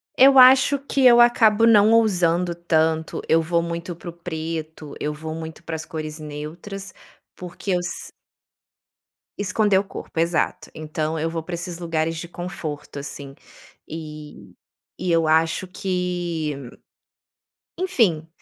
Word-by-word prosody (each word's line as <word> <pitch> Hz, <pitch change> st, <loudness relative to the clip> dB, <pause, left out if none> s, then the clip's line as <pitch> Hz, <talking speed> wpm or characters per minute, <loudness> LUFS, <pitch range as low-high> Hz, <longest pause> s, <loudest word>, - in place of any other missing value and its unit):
Eu 270 Hz, +1 st, +7 dB
acho 260 Hz, +2 st, +7 dB
que 275 Hz, -1 st, -1 dB
eu 240 Hz, 0 st, +7 dB
acabo 230 Hz, -2 st, +5 dB
não 215 Hz, -2 st, +6 dB
ousando 180 Hz, -6 st, +2 dB
tanto, 160 Hz, -2 st, 0 dB
eu 165 Hz, 0 st, +4 dB
vou 170 Hz, +1 st, 0 dB
muito 170 Hz, +1 st, -5 dB
para 175 Hz, -, -9 dB
o -, -, -8 dB
preto, 160 Hz, -3 st, -6 dB
eu 150 Hz, -, -2 dB
vou 155 Hz, +1 st, -6 dB
muito 160 Hz, +1 st, -8 dB
para 165 Hz, -, -5 dB
as 155 Hz, -, -6 dB
cores 155 Hz, -1 st, -6 dB
neutras, 160 Hz, +7 st, -8 dB, 0.4 s
porque 180 Hz, +2 st, -6 dB
eu 180 Hz, -, +2 dB
s 175 Hz, 0 st, -6 dB, 1.3 s
Esconder 205 Hz, 0 st, +2 dB
o -, -, -2 dB
corpo, 195 Hz, -4 st, -7 dB
exato. 170 Hz, 0 st, 0 dB
Então, 155 Hz, +1 st, -3 dB
eu 160 Hz, +1 st, -1 dB
vou 165 Hz, 0 st, -3 dB
para 170 Hz, +2 st, -5 dB
esses 175 Hz, 0 st, -6 dB
lugares 165 Hz, -1 st, -1 dB
de 170 Hz, -, -6 dB
conforto, 170 Hz, -5 st, -6 dB
assim. 140 Hz, -1 st, -8 dB, 0.5 s
E 155 Hz, -1 st, -9 dB, 0.5 s
e 180 Hz, -, -1 dB
eu 165 Hz, -1 st, +3 dB
acho 160 Hz, +3 st, +2 dB
que, 175 Hz, -5 st, -2 dB, 1.2 s
enfim, 200 Hz, -, +1 dB
170 Hz, 140 wpm, -22 LUFS, 160-185 Hz, 1.3 s, Eu